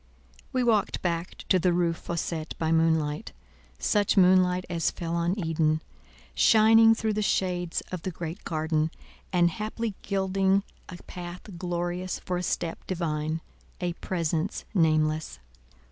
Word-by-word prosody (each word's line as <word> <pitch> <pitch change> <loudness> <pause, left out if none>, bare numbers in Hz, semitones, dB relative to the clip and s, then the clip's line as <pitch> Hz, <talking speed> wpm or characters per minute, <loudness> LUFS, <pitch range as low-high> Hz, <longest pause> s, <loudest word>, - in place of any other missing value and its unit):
We 255 -2 +1
walked 220 -4 +1
back 170 0 -2
to 185 - +5
the 180 +1 +2
Rue 170 -1 +2
Fossette 165 -1 -4
by 160 -1 0
moonlight—such 150 - 0
moonlight 185 -1 +5
as 170 -2 0
fell 170 -1 -5
on 170 +3 0
Eden—shining 215 +7 +3
through 220 -1 -1
the 215 - -1
shades 180 -4 0
of 180 -2 -4
the 185 - -3
Great 170 +1 -6
Garden, 155 -1 0 0.4
and 175 -1 +3
haply 215 +3 -3
gilding 195 0 +1 0.3
a 180 - -7
path 175 0 -8 0.2
glorious 175 +1 -2
for 180 - -3
a - - -2
step 170 -2 -2
divine—a 165 +1 -4
Presence 170 +1 -2
nameless. 155 -3 +2
175 Hz, 125 wpm, -27 LUFS, 160-190 Hz, 0.4 s, to